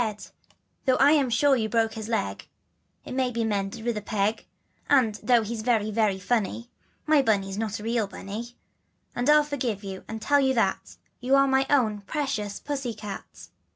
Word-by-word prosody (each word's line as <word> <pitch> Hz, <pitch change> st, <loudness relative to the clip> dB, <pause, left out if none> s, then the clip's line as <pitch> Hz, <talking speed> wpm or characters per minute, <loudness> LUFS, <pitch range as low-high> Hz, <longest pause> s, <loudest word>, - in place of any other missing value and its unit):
And 210 Hz, -2 st, -6 dB, 0.5 s
though 260 Hz, -1 st, +3 dB
I'm 285 Hz, -1 st, +5 dB
sure 275 Hz, +4 st, +3 dB
you 220 Hz, -3 st, -1 dB
broke 225 Hz, 0 st, +1 dB
his 220 Hz, -1 st, -6 dB
leg, 100 Hz, -, -2 dB, 0.6 s
It -, -, -8 dB
may 260 Hz, -1 st, +1 dB
be 235 Hz, -1 st, -2 dB
mended 210 Hz, +1 st, -2 dB
with 235 Hz, -1 st, 0 dB
a -, -, -3 dB
peg, 210 Hz, +1 st, -1 dB, 0.4 s
And 255 Hz, -7 st, +4 dB
though 240 Hz, -2 st, +3 dB
he's 220 Hz, +1 st, -4 dB
very, 215 Hz, -2 st, +1 dB
very, 210 Hz, -3 st, +1 dB
funny, 235 Hz, +3 st, -2 dB, 0.3 s
My 305 Hz, -2 st, +4 dB
Bunny's 195 Hz, -5 st, 0 dB
not 215 Hz, -1 st, -3 dB
a -, -, -9 dB
real 230 Hz, -2 st, 0 dB
Bunny, 215 Hz, +5 st, -8 dB, 0.6 s
And 245 Hz, +4 st, 0 dB
I'll 300 Hz, 0 st, +6 dB
forgive 250 Hz, -8 st, -3 dB, 0.2 s
and 220 Hz, 0 st, -5 dB
tell 285 Hz, +6 st, +3 dB
you 265 Hz, -1 st, +2 dB
that, 230 Hz, -, -1 dB, 0.2 s
You're 275 Hz, +2 st, +4 dB
my 265 Hz, 0 st, +2 dB
own 220 Hz, -8 st, +2 dB
precious 210 Hz, -4 st, -3 dB
pussy 270 Hz, -5 st, -4 dB
cat." 205 Hz, -2 st, -9 dB
230 Hz, 175 wpm, -26 LUFS, 210-265 Hz, 0.6 s, I'll